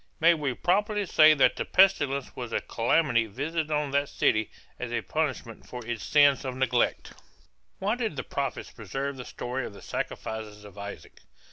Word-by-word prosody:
May 170 +1 +6
we 145 -6 -2
properly 205 +3 +1
say 155 -3 +6
that 140 - +3
the - - -1
pestilence 145 -8 +3
was 120 -3 -6
a - - +1
calamity 120 -1 +1
visited 150 +8 -3
on 150 -2 0
that 140 0 +1
city 110 -1 +1 0.3
as - - -4
a - - -1
punishment - - -3
for 125 -2 -8
its 120 -1 -4
sin 145 -2 +5
of 130 -2 -4
neglect? 125 -2 0 0.6
Why 200 +3 0
did 230 -8 -2
the - - -3
prophets 140 -2 -4
preserve 135 +6 -4
the 125 -1 -8
story 125 +2 -4
of 105 - -7
the 100 - -13
sacrifices 105 -2 -5
of 100 - -13
Isaac? 100 0 -9
135 Hz, 175 wpm, -27 LUFS, 120-155 Hz, 0.6 s, May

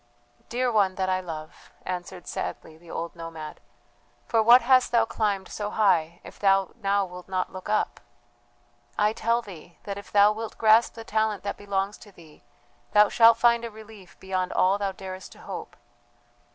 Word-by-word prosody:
"Dear 250 +1 0
one 200 -4 +2
that 185 0 -1
I 185 0 +1
love," 160 -4 -9
answered 180 -1 -6
sadly 155 - -5
the 165 +1 -18
old 170 +1 -5
nomad, 165 -2 -8 0.7
"for 225 -2 +2
what 235 +3 +7
hast 255 +1 +4
thou 230 -2 +4
climbed 205 -4 -1
so 205 -1 -4
high 175 -6 +1
if - - -13
thou 195 -1 +3
now 200 0 +1
wilt 180 0 -11
not 185 -1 -2
look 185 +2 -8
up? 215 - 0 1.0
I 210 +1 +2
tell 230 +2 0
thee 175 -4 -12
that 200 0 -5
if 200 - -14
thou 205 0 +6
wilt 220 +1 -6
grasp 220 +1 +4
the 225 - -8
talent 220 -2 -1
that 200 - -3
belongs 200 0 -3
to 205 - -15
thee 160 -5 -18 0.5
thou 210 0 +6
shalt 230 -1 +6
find 235 0 +3
a 235 - -4
relief 215 -4 -14
beyond 185 -1 -2
all 195 +2 +2
thou 200 -1 -1
darest 190 0 -9
to - - -17
hope. - - -8
200 Hz, 180 wpm, -26 LUFS, 185-220 Hz, 1.0 s, what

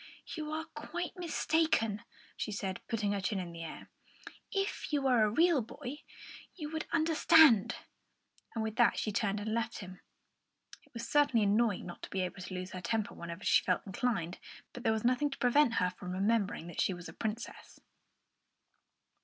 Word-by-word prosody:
"You 305 -2 -4
are 315 +1 -3
quite 340 +4 -5
mistaken," 320 - +1 0.3
she 215 - -3
said, 195 -2 -3
putting 210 -3 0
her 200 -1 -1
chin 205 +2 -1
in 180 -2 -4
the 165 0 -7
air. 160 - -9 0.6
"If 390 -3 -2
you 295 - +2
were 250 -4 +4
a 215 - +3
real 325 +4 +4
boy 275 +4 -7 0.6
you 305 -4 -6
would 315 -1 -3
understand." 320 -7 +6 0.8
And 225 - 0
with 220 0 -4
that 235 -4 +4
she 215 - -1
turned 205 0 0
and 215 +1 -3
left 230 0 -1
him. 185 -2 -9 0.8
It - - -26
was 230 - -5
certainly 280 -7 +3
annoying 210 0 +2
not 175 - -9
to - - -7
be 190 - -1
able 185 +1 -4
to 180 +1 -7
lose 180 0 -5
her 185 - -6
temper 215 +4 -1
whenever 170 +2 -7
she - - +4
felt 180 - 0
inclined, 195 -4 -2 0.3
but 245 - -7
there 225 - +2
was 220 +1 -1
nothing 255 +4 +3
to 275 - -7
prevent 245 0 +4
her 180 0 +2
from 180 0 -7
remembering 200 -2 +1
that 170 -2 -3
she 185 - +1
was 175 0 -9
a - - -9
princess. 220 +1 -5
220 Hz, 185 wpm, -32 LUFS, 190-290 Hz, 0.8 s, understand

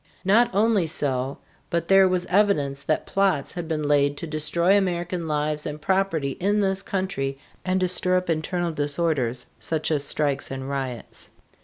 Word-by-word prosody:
Not 230 +5 +4
only 210 -4 +2
so, 135 -3 -1 0.3
but 170 -1 -1
there 195 0 +6
was 180 -1 0
evidence 180 -9 +1
that 155 - 0
plots 195 -8 0
had 175 -2 -5
been 155 -2 -2
laid 145 -1 +2
to - - -5
destroy 170 +4 +1
American 175 -3 -1
lives 150 0 -1
and 150 0 -5
property 175 -5 0
in 205 +3 +1
this 195 -1 +1
country 160 -9 -3 0.3
and 185 0 0
to 185 - +2
stir 180 0 +3
up 185 - -2
internal 170 +2 -1
disorders, 145 -5 0
such 160 0 -1
as 145 -2 +1
strikes 145 -1 0
and 135 0 -5
riots. 130 -4 -5
165 Hz, 165 wpm, -24 LUFS, 145-185 Hz, 0.3 s, there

